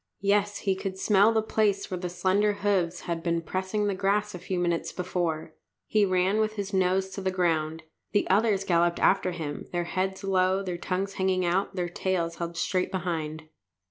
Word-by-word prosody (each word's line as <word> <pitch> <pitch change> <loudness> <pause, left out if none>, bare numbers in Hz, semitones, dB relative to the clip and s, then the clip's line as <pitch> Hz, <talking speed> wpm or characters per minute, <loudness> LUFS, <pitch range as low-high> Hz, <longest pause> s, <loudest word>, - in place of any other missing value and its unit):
Yes, 205 0 +2
he 195 -2 +1
could 190 0 -4
smell 205 +2 +4
the 220 -1 +1
place 205 -3 0
where 180 - -2
the 180 0 -3
slender 190 +4 +2
hoofs 190 -4 0
had 170 -2 -3
been 170 -1 0
pressing 190 +4 -1
the 200 - +1
grass 200 +2 0
a 180 - -6
few 185 +1 -3
minutes 175 -1 0
before. 170 -3 -2 0.3
He 210 -1 +3
ran 185 +2 +2
on, - - +3
with 215 0 0
his 200 -1 -4
nose 190 0 +2
to 195 - -5
the 190 - 0
ground. 160 -3 0 0.3
The 205 - +2
others 200 0 +3
galloped 170 -2 +2
after 190 -1 +3
him, 155 -4 -5
their 175 -1 0
heads 190 +2 -2
low, 190 0 +2
their 180 -2 -4
tongues 195 +2 -2
hanging 190 -1 +1
out, 190 +3 0
their 180 -2 -1
tails 175 -1 -2
held 170 -1 -4
straight 185 0 0
behind. 160 -4 -3
185 Hz, 195 wpm, -27 LUFS, 175-195 Hz, 0.3 s, smell